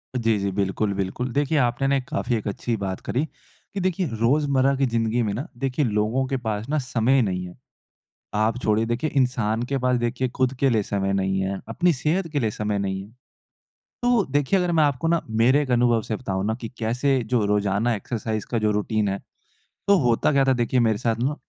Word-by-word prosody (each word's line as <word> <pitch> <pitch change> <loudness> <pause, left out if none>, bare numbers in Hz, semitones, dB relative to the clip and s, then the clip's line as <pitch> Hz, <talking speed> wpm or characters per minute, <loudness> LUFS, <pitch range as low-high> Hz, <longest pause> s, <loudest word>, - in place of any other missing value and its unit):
जी, 115 -3 +2
जी। 100 0 -1
बिल्कुल, 100 +1 -1
बिल्कुल। 100 +6 -3
देखिए, 145 +2 +1
आपने 125 0 +1
ना 140 - +3
एक 130 -2 -2
काफ़ी 120 -1 -1
एक 110 - -3
अच्छी 115 +3 -2
बात 95 -1 -3
करी 130 - 0
कि, 195 - -12
देखिए 185 -1 0
रोज़मर्रा 140 +2 +3
की 135 0 +1
ज़िंदगी 115 -1 0
में 105 -2 -1
ना 130 - -4 0.2
देखिए 135 +2 +1
लोगों 110 +4 0
के 135 - -1
पास 110 +3 -2
ना 155 - +1
समय 125 +2 +2
नहीं 90 -4 -1
है। 90 - -12 0.9
आप 110 +2 +1
छोड़िए 110 0 +2
देखिए 120 +6 -1
इंसान 120 -4 +1
के 140 - +2
पास 125 -1 +1
देखिए 120 +2 -1
खुद 130 0 +2
के 135 - +4
लिए 110 -4 +2
समय 100 -1 -1
नहीं 95 0 0
है, 95 0 -2
अपनी 175 +10 +2
सेहत 160 +6 0
के 145 - 0
लिए 110 -5 0
समय 105 -1 -2
नहीं 95 -1 -2
है। 100 - -11 0.9
तो, 245 -5 +3
देखिए 145 +7 +2
अगर 180 -1 0
मैं 160 -2 +4
आपको 145 +1 0
ना, 170 0 +2
मेरे 120 +6 +3
एक 135 -3 -3
अनुभव 120 -1 +3
से 110 - -3
बताऊँ 95 -4 -3
ना 110 - +1
कि 115 - -5
कैसे 125 +4 +1
जो 115 -4 +3
रोज़ाना 105 +3 +1
एक्सरसाइज़ 110 +1 -3
का 120 - +1
जो 110 -1 +2
रूटीन 105 0 0
है, 100 0 -2 0.7
तो 200 0 +6
होता 120 +4 +2
क्या 140 -2 +3
था 135 - +4
देखिए 120 +1 +1
मेरे 110 -3 +2
साथ 115 0 0
ना, 145 +3 0
120 Hz, 215 wpm, -24 LUFS, 105-135 Hz, 0.9 s, तो